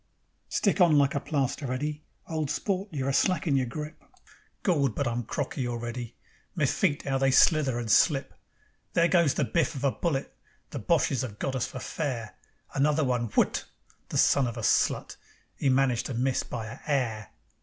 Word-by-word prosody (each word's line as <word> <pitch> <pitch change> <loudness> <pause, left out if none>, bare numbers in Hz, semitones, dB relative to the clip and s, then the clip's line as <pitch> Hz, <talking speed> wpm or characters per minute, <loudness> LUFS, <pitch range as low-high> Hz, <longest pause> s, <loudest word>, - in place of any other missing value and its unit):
"Stick 200 -2 +1
on 165 -4 +6
like 140 -1 +3
a 140 - 0
plaster, 140 -2 -2
Eddy. 150 +4 -3 0.3
Old 155 -3 -2
sport, 195 +4 -2
you're 135 -3 -2
a - - 0
slackin' 165 -1 +2
your 130 -2 +1
grip." 150 +5 -7 0.6
Gord! 140 - +2
But 140 - -1
I'm 120 +1 -1
crocky 130 +1 -3
already; 120 0 -5 0.4
My - - +2
feet, 145 - 0
'ow 135 -1 0
they 135 0 +3
slither 135 -1 +4
and 115 -2 -2
slip! 140 0 +3 0.6
There 170 - +4
goes 170 -5 +3
the - - +1
biff 165 -2 0
of 135 - -5
a 140 - +3
bullet. 145 -4 -2 0.4
The - - -4
Boches 130 - +1
have 115 -6 -6
got 135 +4 -2
us 130 - -1
for - - -8
fair. 120 -5 -4 0.4
Another 150 +3 +2
one 125 -3 0
WHUT! - - +2 0.4
The - - -2
son 140 -3 +4
of 120 0 -5
a 115 - -5
slut! - - +1 0.4
'E 140 - +3
managed 130 -3 +2
to 130 - -4
miss 130 +2 +1
by 115 -3 -5
a 110 - -9
'air. 120 -8 -1
135 Hz, 185 wpm, -28 LUFS, 125-150 Hz, 0.6 s, on